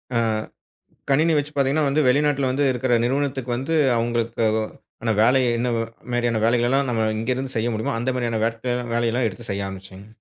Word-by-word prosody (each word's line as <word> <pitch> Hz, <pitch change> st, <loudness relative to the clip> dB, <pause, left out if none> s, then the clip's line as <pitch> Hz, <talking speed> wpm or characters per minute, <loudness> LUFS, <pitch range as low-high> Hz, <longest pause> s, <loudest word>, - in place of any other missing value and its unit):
ஆ, -, -, +3 dB, 0.9 s
கணினி 155 Hz, +4 st, +3 dB
வச்சு 145 Hz, +1 st, -2 dB
பாத்தீங்கன்னா, 140 Hz, +2 st, +2 dB
வந்து 150 Hz, +3 st, +2 dB
வெளிநாட்டில 140 Hz, 0 st, +2 dB
வந்து 140 Hz, +3 st, 0 dB
இருக்கிற 125 Hz, 0 st, 0 dB
நிறுவனத்துக்கு 135 Hz, -1 st, -1 dB
வந்து, 135 Hz, +6 st, -2 dB, 0.2 s
அவுங்களுக்கு 115 Hz, 0 st, -1 dB, 0.2 s
ஒ -, -, -1 dB, 0.4 s
ஆனா 115 Hz, -, +1 dB
வேல 125 Hz, +4 st, +5 dB, 0.2 s
என்ன 120 Hz, +1 st, 0 dB, 0.4 s
மாரியான 120 Hz, -2 st, +1 dB
வேலைகள்லாம் 120 Hz, +4 st, +2 dB
நம்ம 115 Hz, -2 st, 0 dB, 0.2 s
இங்க 115 Hz, +3 st, -3 dB
இருந்து 130 Hz, 0 st, -5 dB
செய்ய 110 Hz, +1 st, 0 dB
முடியுமோ, 110 Hz, +1 st, -2 dB
அந்த 120 Hz, -, -1 dB
மாரியான 120 Hz, -3 st, -1 dB, 0.5 s
வேலையெல்லாம் 120 Hz, +1 st, +1 dB
எடுத்து 110 Hz, +3 st, -7 dB
செய்ய 100 Hz, 0 st, -2 dB
ஆரம்பிச்சேங்க. 95 Hz, +1 st, -10 dB
120 Hz, 165 wpm, -23 LUFS, 115-135 Hz, 0.9 s, வேல